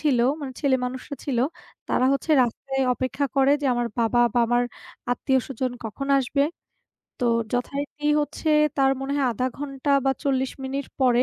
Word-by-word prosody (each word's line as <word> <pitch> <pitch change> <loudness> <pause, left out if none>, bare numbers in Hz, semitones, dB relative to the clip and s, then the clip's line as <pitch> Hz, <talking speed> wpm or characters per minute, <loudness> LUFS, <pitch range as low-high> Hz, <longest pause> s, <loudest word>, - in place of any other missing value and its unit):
ছিল, 285 -5 +2 0.2
মানে 275 -3 -5
ছেলে 275 -3 +3
মানুষও 255 +3 -5
ছিল, 265 -4 -1 0.5
তারা 255 - +2
হচ্ছে 275 +3 -2
রাস্তায় 270 +3 -2
অপেক্ষা 260 +3 -1
করে 270 +1 +5
যে, - - +1
আমার 240 0 0
বাবা 235 +1 +3
বা - - +3
আমার 240 +1 +2 0.5
আত্মীয়স্বজন 260 -1 -1
কখন 225 +5 -5
আসবে? 275 +2 +1 0.8
তো - - -1 0.3
যথারীতি 280 +4 -3 0.2
হচ্ছে 305 +2 -3 0.3
তার 270 -1 +4
মনে 270 +1 -3
হয় 280 -2 +2
০.৫ 250 +3 -1
ঘণ্টা 280 0 -3
বা 270 - +3
৪০ 265 -3 +1
মিনিট 275 +1 -3
পরে 250 -2 +4
270 Hz, 160 wpm, -24 LUFS, 250-280 Hz, 0.8 s, করে